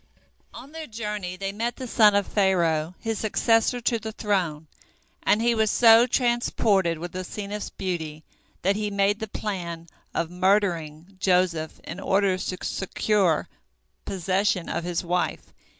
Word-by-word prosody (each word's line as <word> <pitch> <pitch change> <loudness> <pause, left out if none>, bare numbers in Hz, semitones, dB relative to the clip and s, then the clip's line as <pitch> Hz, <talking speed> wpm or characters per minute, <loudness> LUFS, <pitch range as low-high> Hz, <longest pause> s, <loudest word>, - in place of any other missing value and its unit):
On 275 - -11
their 320 -1 -7
journey 210 -5 -4
they 195 +1 -3
met 230 +4 -2
the 260 - -6
son 210 -3 +5
of 200 -1 +2
Pharaoh, 170 -4 +1
his 225 -2 -3
successor 225 +2 +2
to 235 -1 +1
the 220 +1 -6
throne, 185 -8 -1 0.6
and 220 +2 +2
he 235 0 +3
was 220 -1 +2
so 230 +1 +6
transported 230 -8 +1
with 175 +2 -7
Asenath's 200 +3 -5
beauty, 160 -5 -4 0.4
that 195 +2 +2
he 210 0 -2
made 200 +1 +1
the 220 - -4
plan 175 -6 -5 0.3
of 165 0 -2
murdering 180 -2 0
Joseph 180 -4 +1
in 180 - -7
order 195 -1 +2
to 185 - -3
secure 190 -3 +1 0.6
possession 190 0 0
of 170 - -2
his 175 0 -2
wife. 180 +1 -2
195 Hz, 145 wpm, -25 LUFS, 175-215 Hz, 0.6 s, so